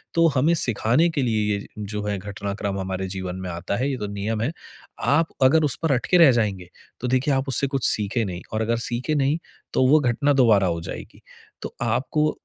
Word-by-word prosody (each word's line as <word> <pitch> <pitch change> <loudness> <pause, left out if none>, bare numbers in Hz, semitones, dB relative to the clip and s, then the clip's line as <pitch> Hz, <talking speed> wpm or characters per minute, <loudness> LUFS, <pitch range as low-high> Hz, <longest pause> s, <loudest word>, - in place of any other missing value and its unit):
तो 165 0 +5
हमें 155 +6 +3
सिखाने 125 +4 +2
के 150 -4 -1
लिए 110 -3 0
ये 100 - -6
जो 105 0 -4
है 100 - -1
घटनाक्रम 100 0 -4
हमारे 95 0 -3
जीवन 95 -1 -5
में - - -4
आता 85 +3 -3
है, 130 +3 0
ये 130 - -3
तो 105 - -4
नियम 105 +2 -2
है। 120 +7 0 0.5
आप 145 +7 +2 0.2
अगर 155 +5 +5
उस 145 -4 +1
पर 160 - +2
अटके 135 +8 +2
रह 165 -6 +8
जाएँगे, 95 -5 -2 0.3
तो 125 - -2
देखिए 130 +3 +1
आप 135 +1 0
उससे 135 +2 +2
कुछ 135 -2 -2
सीखे 110 +3 +1
नहीं 90 -2 -5
और 110 - -1
अगर 115 +1 0
सीखे 125 +6 -2
नहीं, 145 +2 +1 0.4
तो 130 - +3
वो 155 +3 +6
घटना 140 +2 +1
दोबारा 110 -8 +4
हो 85 -1 -1
जाएगी। - - -9 0.4
तो - - -7
आपको 130 +6 0
120 Hz, 210 wpm, -23 LUFS, 100-140 Hz, 0.5 s, रह